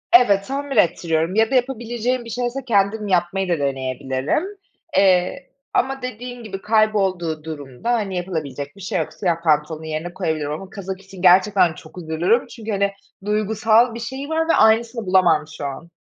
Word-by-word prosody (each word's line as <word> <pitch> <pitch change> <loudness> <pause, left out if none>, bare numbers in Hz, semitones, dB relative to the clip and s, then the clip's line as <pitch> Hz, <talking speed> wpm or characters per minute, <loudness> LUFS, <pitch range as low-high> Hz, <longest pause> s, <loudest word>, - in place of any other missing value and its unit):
Evet, 200 -5 +5
tamir 275 -1 -3
ettiriyorum 170 -1 +2
ya 225 +2 +3
da - - +2
yapabileceğim 240 -1 -1
bir - - -8
şeyse 245 +3 -2
kendim 210 -1 +1
yapmayı 185 0 0
da 170 -4 +1
deneyebilirim. 135 - -1 0.5
Eee, 190 +7 +2 0.2
ama 270 +1 0
dediğin 245 0 -6
gibi 195 -3 -7
kaybolduğu 195 -7 +1
durumda, 145 - -5
hani, 205 -5 -1
yapılabilecek 145 -6 -4
bir 200 - -13
şey 190 - -2
yok. - - -3
Siyah 170 -4 -1
pantolonu 155 0 +1
yerine 160 +3 -4
koyabilirim 160 -5 -2
ama 185 +5 -6
kazak 190 -1 -6
için 195 -2 -12
gerçekten 185 -1 +5
çok 155 +3 -14
üzülürüm 175 +8 +1
çünkü, 225 -3 -7
hani, 200 0 +1 0.3
duygusal 220 +3 +2
bir 235 - -6
şeyi 265 +4 -6
var 325 +1 0
ve - - +5
aynısını 225 +1 +3
bulamam 175 -5 +4
şu 145 - -5
an. 140 +4 -6
195 Hz, 165 wpm, -21 LUFS, 165-230 Hz, 0.5 s, Evet